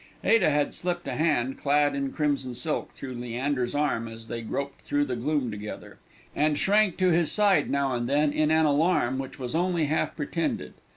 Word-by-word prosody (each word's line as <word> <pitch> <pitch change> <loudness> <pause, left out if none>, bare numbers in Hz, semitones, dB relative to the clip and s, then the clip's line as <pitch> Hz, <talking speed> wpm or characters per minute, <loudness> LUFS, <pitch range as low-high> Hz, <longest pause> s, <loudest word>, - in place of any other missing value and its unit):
Ada 225 -8 +4
had 145 -1 +1
slipped 175 -1 -3
a - - -2
hand, 140 -5 0
clad 145 0 +2
in 140 -1 -2
crimson 140 -4 -1
silk, 155 +4 -1
through 130 -1 -8
Leander's 125 +2 -2
arm 145 -6 0
as 115 0 -10
they 115 -1 -4
groped 140 +5 -4
through 145 0 0
the 130 -3 -3
gloom 130 0 -1
together, 105 0 -8 0.4
and 150 0 +2
shrank 205 0 +3
to 185 -1 +3
his 170 -2 +2
side 205 -2 +3
now 140 -1 0
and 120 -1 -2
then 145 +1 +2
in 155 0 +2
an 160 0 +4
alarm 145 -3 +2
which 135 -1 -6
was 125 -3 -5
only 175 -1 +1
half 155 +2 -1
pretended. 165 +2 -3
145 Hz, 190 wpm, -27 LUFS, 130-160 Hz, 0.4 s, Ada